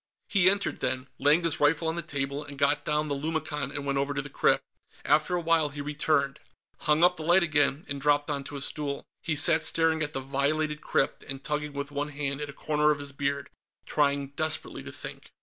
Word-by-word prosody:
He 190 -2 +5
entered, 200 +1 0
then, 130 +1 -1
laying 150 +5 +4
his 165 -2 0
rifle 150 +3 +3
on 160 - 0
the 170 - -2
table, 140 -2 -3
and 145 -1 -10
got 145 +1 +2
down 150 0 0
the 145 - -1
lumicon 150 -1 -2
and 140 0 -5
went 140 -1 0
over 140 +1 -1
to - - 0
the - - -10
crypt. - - +2 0.4
After 155 +4 +3
a 175 - 0
while, 165 -2 +2
he 145 0 -9
returned, 145 -1 0 0.4
hung 150 +2 +2
up 180 0 +5
the 160 - -5
light 175 +3 +5
again, 150 -2 +2
and 140 -1 -4
dropped 145 0 +3
onto 145 -1 -4
a 140 - -4
stool. 140 0 -3 0.2
He 160 - -1
sat 160 +2 +6
staring 160 -1 +1
at 150 0 -2
the 135 - -2
violated 150 +3 0
crypt 135 - 0
and 135 0 -7
tugging 150 0 -2
with 140 +1 -4
one 145 +1 -2
hand 140 0 -3
at 145 - -4
a - - -8
corner 150 0 +3
of 150 - +2
his 145 -1 -7
beard, 140 0 -2 0.3
trying 140 -2 +1
desperately 155 +2 -2
to - - -9
think. - - -9
145 Hz, 220 wpm, -28 LUFS, 140-155 Hz, 0.4 s, sat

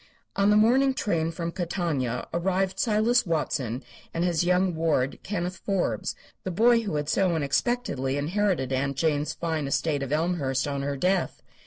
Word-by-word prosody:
On 200 +1 +3
the 210 - +5
morning 260 +5 +4
train 165 -9 0
from 165 0 -4
Catania 165 -9 -2
arrived 190 +2 0
Silas 230 +2 +3
Watson 135 -6 -1 0.3
and 165 - 0
his 175 -2 +1
young 180 +1 +2
ward 160 -5 0
Kenneth 180 -2 -3
Forbes, 195 -3 -1 0.3
the - - -3
boy 230 +6 +4
who 200 -8 -3
had 145 -1 -1
so 180 +2 +2
unexpectedly 140 - 0
inherited 160 -3 0
Aunt 135 +1 -1
Jane's 150 -1 0
fine 160 -4 -2
estate 145 +1 0
of 135 -1 -4
Elmhurst 150 -5 0
on 140 -1 -2
her 140 0 -2
death. 185 +4 0
170 Hz, 160 wpm, -26 LUFS, 145-195 Hz, 0.3 s, the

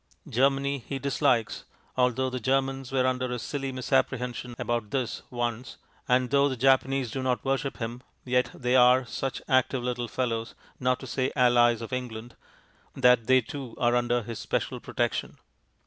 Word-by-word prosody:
Germany 140 +3 +1
He 140 - -3
dislikes 135 -4 0 0.3
(although 130 +1 +1
the 130 - -3
Germans 135 +1 0
were 130 -1 +2
under 130 -1 0
a 125 - -2
silly 135 +3 -4
misapprehension 125 -1 -1
about 120 -3 -2
this 125 -2 -2
once), 120 0 -3 0.3
and 125 0 +2
though 140 0 +4
the 130 - -4
Japanese 135 -1 +2
do 135 - -3
not 125 -4 -1
worship 135 0 -1
Him, 120 +1 -5 0.2
yet 125 0 +1
they 125 0 -1
are 125 +1 +6
such 135 +3 -4
active 130 -1 +2
little 125 -1 -2
fellows, 115 -1 -2 0.2
not 130 0 +1
to - - -7
say 130 +1 -1
Allies 120 -3 +4
of 115 - -7
England, 120 -2 -5 0.6
that 125 -3 +4
they 130 0 +5
too 130 0 -8
are 120 0 +2
under 120 0 +1
His 115 +1 -6
special - - -2
protection. - - -2
125 Hz, 165 wpm, -27 LUFS, 120-135 Hz, 0.6 s, are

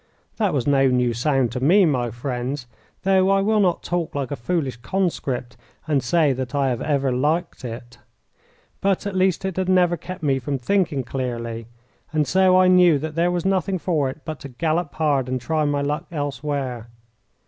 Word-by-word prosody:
That 210 -4 +1
was 130 -5 -1
no 135 -1 +4
new 125 -2 +2
sound 130 0 +1
to 125 - -3
me, 180 +9 +5
my 125 -6 0
friends, 125 +2 -4 0.4
though 190 0 +3
I 195 0 +3
will 215 +2 +2
not 180 -4 +1
talk 175 -3 -2
like 140 -2 -3
a - - -1
foolish 135 +1 -2
conscript 130 -5 -2 0.3
and 145 -3 +2
say 150 +2 +2
that 130 +2 -5
I 140 -1 +2
have 120 -2 -2
ever 140 -3 0
liked 150 +6 -1
it. 120 0 -8 0.8
But 195 0 +1
at 200 -2 -3
least 185 0 +1
it 190 -2 -3
had 185 0 0
never 180 -2 +3
kept 180 +2 -8
me 135 -2 +2
from 135 +2 -2
thinking 150 -1 0
clearly, 115 -3 -4 0.4
and 155 -1 +1
so 185 +3 +4
I 185 - +5
knew 180 -4 +6
that 155 +2 -5
there 170 +2 +2
was 175 -1 -2
nothing 190 0 +1
for 160 -6 0
it 140 +4 -9
but 155 -2 -5
to 140 - -9
gallop 160 +4 -1
hard 145 -5 +1
and 130 0 -1
try 155 +5 0
my 145 -1 0
luck 145 +1 -2
elsewhere. 140 -5 -3
145 Hz, 190 wpm, -22 LUFS, 130-175 Hz, 0.8 s, knew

